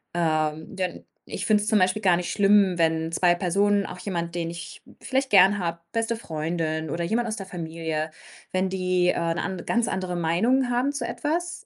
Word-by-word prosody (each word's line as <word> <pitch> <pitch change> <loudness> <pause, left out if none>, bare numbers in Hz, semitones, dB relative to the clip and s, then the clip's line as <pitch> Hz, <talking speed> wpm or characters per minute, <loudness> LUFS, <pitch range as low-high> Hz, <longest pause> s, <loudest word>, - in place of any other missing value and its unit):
Ähm, 160 +3 -1
denn 185 -1 -4 0.2
ich - - -5
finde 210 -1 +3
es - - -5
zum 215 - +4
Beispiel 185 +3 +2
gar 180 -4 +4
nicht 180 - -3
schlimm, 200 -2 +4
wenn 160 -1 +1
2 175 0 +4
Personen, 200 +3 +2
auch - - -7
jemand, 170 -3 -4
den 170 -1 -2
ich 170 0 -9 0.2
vielleicht 265 0 -1
gerne 195 +1 +6
habe, 170 -2 -2
beste 230 0 0
Freundin 160 -3 -3
oder 170 +3 -2
jemand 235 +5 0
aus 220 - -3
der 195 - -6
Familie, 160 -3 -4 0.4
wenn 185 0 0
die, 185 -1 +1
äh, - - +3 0.2
'ne - - -2
an 185 -2 -4
ganz 235 0 +1
andere 185 -4 -2
Meinung 225 +11 +2
haben 245 +3 +1
zu 275 -4 -3
etwas. 335 +8 -3
185 Hz, 195 wpm, -25 LUFS, 170-215 Hz, 0.4 s, gerne